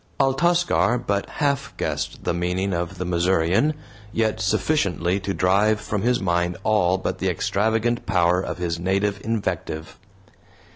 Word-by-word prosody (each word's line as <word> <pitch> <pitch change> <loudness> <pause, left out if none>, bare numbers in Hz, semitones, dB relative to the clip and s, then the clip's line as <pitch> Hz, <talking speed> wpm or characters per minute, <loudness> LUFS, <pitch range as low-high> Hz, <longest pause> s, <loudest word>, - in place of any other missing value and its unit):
Altascar 150 -1 +2
but 100 -4 -2
half 140 -3 -1
guessed - - -3
the 85 - 0
meaning 90 +3 -1
of 85 +2 -3
the 90 - -3
Missourian, 90 - +2 0.4
yet 110 -3 0
sufficiently 95 - +1
to 100 0 -3
drive 100 +3 +2
from 100 0 -3
his 125 +3 +2
mind 90 -1 0
all 100 -4 +3
but - - -3
the - - 0
extravagant 110 +3 0
power 90 -2 +3
of - - -4
his 85 -2 -2
native 100 +2 0
invective. 95 -8 -3
95 Hz, 140 wpm, -23 LUFS, 90-110 Hz, 0.4 s, all